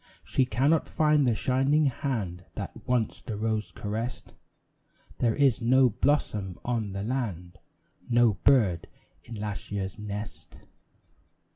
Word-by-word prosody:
She 130 - +1
cannot 135 +7 +1
find 150 -3 +3
the 115 - +2
shining 135 +6 +2
hand 115 - -2
That - - -7
once 125 -3 0
the 110 -4 -5
rose 110 0 -1
caressed; 110 +4 -5 0.9
There 115 -2 +2
is 135 -5 +3
no 130 +2 +5
blossom 105 -7 0
on 115 -5 -1
the 100 0 -3
land, 95 -7 -3 0.5
No 120 -2 +4
bird 105 -12 +3 0.4
in 115 - -9
last 105 -1 -5
year's 95 0 -4
nest. 105 -1 -7
115 Hz, 125 wpm, -28 LUFS, 105-130 Hz, 0.9 s, no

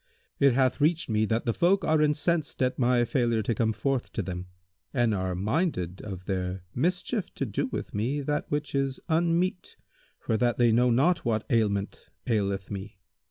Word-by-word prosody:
It 140 -2 +5
hath 130 +2 +2
reached 160 -3 +2
me 110 0 +2
that 115 +2 -1
the 115 - +1
folk 185 - +2
are 155 -1 +3
incensed 150 0 +1
at 130 +1 0
my 120 -1 +3
failure 120 -3 +1
to 115 - 0
come 110 0 +1
forth 125 +4 -2
to 110 - -2
them 90 0 -5 0.5
and 120 -3 +2
are 95 -2 -1
minded 100 - -1
of 95 -3 -7
their 95 -1 -3
mischief 180 - -1
to 135 - -2
do 105 -4 -2
with - - -5
me 125 +8 -1
that 150 +1 -2
which 145 0 -2
is 135 -1 -1
unmeet 170 +3 0 0.4
for 110 - -1
that 120 0 +1
they 120 -2 +4
know 125 +2 +4
not 150 +9 +3
what 110 -2 0
ailment 105 -4 0 0.2
aileth 100 -4 -1
me. 100 0 -6
120 Hz, 180 wpm, -27 LUFS, 105-145 Hz, 0.5 s, It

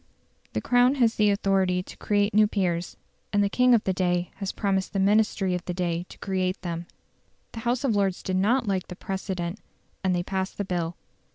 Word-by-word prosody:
The - - -1
Crown 245 +2 +4
has 235 -4 +3
the 210 -2 +3
authority 190 -2 +1
to - - -11
create 205 0 +1
new 215 0 +5
peers; 180 -4 -1 0.3
and 205 -1 +3
the 200 - +1
king 250 +2 +5
of 220 - +1
the 190 - 0
day 180 -1 0
had 195 -2 -4
promised 195 -2 0
the 195 - 0
Ministry 200 -1 +2
of 180 -1 -2
the 180 - -3
day 175 -1 -2
to - - -12
create 185 -1 -1
them. 170 -1 -4 0.6
The 230 - -7
House 245 +3 0
of 245 -6 +2
Lords 195 -2 0
did 185 0 -1
not 235 +6 +2
like 190 -2 -1
the 180 - -8
precedent, 190 0 -4 0.4
and 185 -1 +2
they 175 - 0
passed 190 +1 -3
the 205 - -2
bill. 175 -2 -2
190 Hz, 205 wpm, -26 LUFS, 180-210 Hz, 0.6 s, new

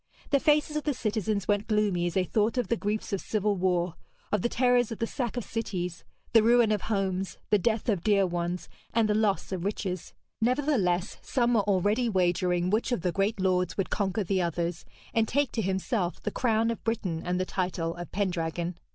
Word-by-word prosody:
The 280 - +5
faces 300 +1 +2
of 300 - -1
the 295 -3 0
citizens 215 -3 -1
went 205 0 +1
gloomy 205 -5 +1
as 175 - -4
they 190 - +3
thought 215 +6 0
of 250 - 0
the 235 - +3
griefs 210 -1 -3
of 195 - -1
civil 210 -1 0
war, 180 -2 +1 0.4
of 210 - +2
the 240 - +1
terrors 245 -1 +3
of 225 - -4
the 230 - 0
sack 240 0 -3
of 245 - -1
cities, 180 -7 -4 0.3
the 225 - +8
ruin 235 0 +5
of 210 -2 +1
homes, 195 -3 -1
the 210 - +5
death 220 +4 0
of 200 -7 +1
dear 200 -2 +4
ones, 175 0 -2 0.3
and 230 -2 +4
the 210 - +2
loss 210 -3 +1
of 185 -3 -3
riches. 190 -3 -3 0.3
Nevertheless, 225 - +1
some 245 -2 +1
were 220 - +4
already 205 +5 +2
wagering 180 -2 +1
which 220 +4 +1
of 240 - 0
the 180 0 0
great 200 +3 0
lords 180 -2 +1
would 195 - -1
conquer 200 +1 0
the 190 0 0
others, 170 0 -2 0.3
and 225 -1 +2
take 280 +1 +1
to 225 - -1
himself 190 -1 -1
the 210 - -1
crown 230 -1 +1
of 230 - -6
Britain 190 -8 -1
and 180 0 -1
the 185 - 0
title 175 -3 -2
of 175 -2 -8
Pendragon. 175 -3 -2
205 Hz, 205 wpm, -28 LUFS, 180-225 Hz, 0.4 s, the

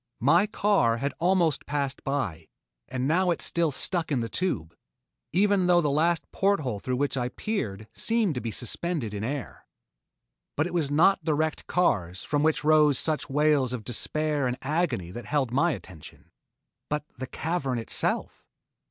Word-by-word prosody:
My 170 - +4
car 200 - +2
had 140 +4 -2
almost 175 -4 +2
passed 140 -2 -2
by, 95 - -2 0.4
and 130 +1 -2
now 180 +4 +2
it 170 - +1
still 170 -1 +1
stuck 165 +4 0
in 135 - +2
the 115 -1 -3
tube, 85 - -2 0.6
even 195 +1 +3
though 175 -1 +5
the 150 -4 +1
last 165 +4 +2
port 200 -3 +2
hole 125 -7 -3
through 125 +4 -2
which 140 +1 0
I 125 -1 -1
peered 110 - -4
seemed 225 -6 +1
to 125 - -4
be 115 - -3
suspended 120 - -3
in 100 0 -4
air. 135 +2 -5 0.9
But 150 - +2
it 175 - -5
was 160 -5 0
not 165 +7 +4
the 155 -3 +1
wrecked 155 0 -2
cars 95 - 0
from 145 -1 0
which 155 0 +2
rose 150 -2 +5
such 155 -2 -1
wails 145 -3 +2
of 120 -3 -4
despair 145 +5 0
and 125 0 -2
agony 135 - -1
that 120 +3 -7
held 140 -3 0
my 155 +7 +3
attention, 90 - -10 0.6
but 150 0 -2
the 130 - -4
cavern 150 -6 -2
itself. 115 - -2
145 Hz, 170 wpm, -27 LUFS, 125-170 Hz, 0.9 s, though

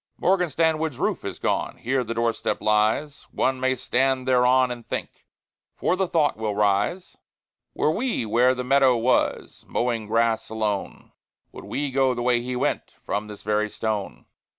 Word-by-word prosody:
Morgan 180 -2 +2
Stanwood's 160 -2 0
roof - - -1
is - - -5
gone; - - -1
Here 130 +2 -1
the 115 0 -5
door 115 0 +1
step - - -2
lies; 110 +8 0
One 130 0 0
may 130 0 +1
stand 130 +1 0
thereon 125 0 +4
and 120 -1 -6
think, - - -6 0.5
For 180 - 0
the 190 0 0
thought 160 -7 +1
will 110 -2 -2
rise, 105 - 0 0.6
Were 155 - +2
we 230 - -1
where 125 +4 +3
the 125 - -3
meadow 130 -1 +4
was, 120 +3 0
Mowing 115 -3 -1
grass 115 +1 +1
alone, 105 -3 -3 0.4
Would - - -11
we 145 -1 -3
go 130 -1 +2
the 120 - -3
way 120 -1 +2
he 125 +1 -4
went, 125 - -2
From 105 +1 -2
this 105 -1 -10
very 105 +1 0
stone? 105 -2 -4
125 Hz, 170 wpm, -24 LUFS, 110-135 Hz, 0.6 s, thereon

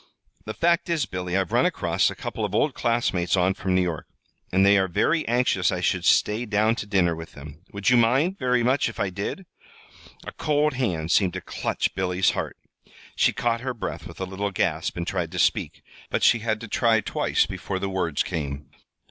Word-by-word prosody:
"The 110 - -5
fact 170 +1 +1
is, 160 -5 +1
Billy, 90 -3 -3
I've 95 -3 -1
run - - +3
across - - +1
a - - -7
couple 110 - -5
of 105 -1 -2
old 145 +5 +2
classmates 105 -7 0
on 90 +1 +3
from 95 -1 -2
New 95 - +3
York, 85 -4 -4 0.4
and 95 +2 +4
they 100 +1 +6
are 95 - +1
very 155 - +1
anxious 115 -7 +2
I 90 - -2
should 90 0 0
stay 110 +3 +3
down 105 +2 +2
to 100 - -5
dinner 90 -5 +2
with 80 +1 -9
them. 75 +3 -11
Would 100 +4 0
you 125 - +6
mind 135 +11 +2
very 125 -2 +1
much 130 +1 +2
if 115 - -10
I 95 - 0
did?" 100 - -5 0.8
A - - -6
cold 150 0 +1
hand 90 -11 -1
seemed 95 -4 +3
to - - -3
clutch - - -2
Billy's 90 0 +1
heart. - - -4 0.6
She - - +3
caught 115 -1 -1
her 130 -1 -3
breath 115 - -5
with - - -12
a 95 - -2
little 95 +2 -3
gasp 85 -5 -1
and 85 - -2
tried 90 -3 -2
to - - -5
speak; - - 0 0.3
but - - -1
she 120 - +5
had 110 -1 -1
to 115 - -7
try 115 0 +2
twice - - +1
before 95 - -5
the 100 - -2
words 90 -6 -1
came. 70 -2 -5
100 Hz, 210 wpm, -24 LUFS, 90-120 Hz, 0.8 s, they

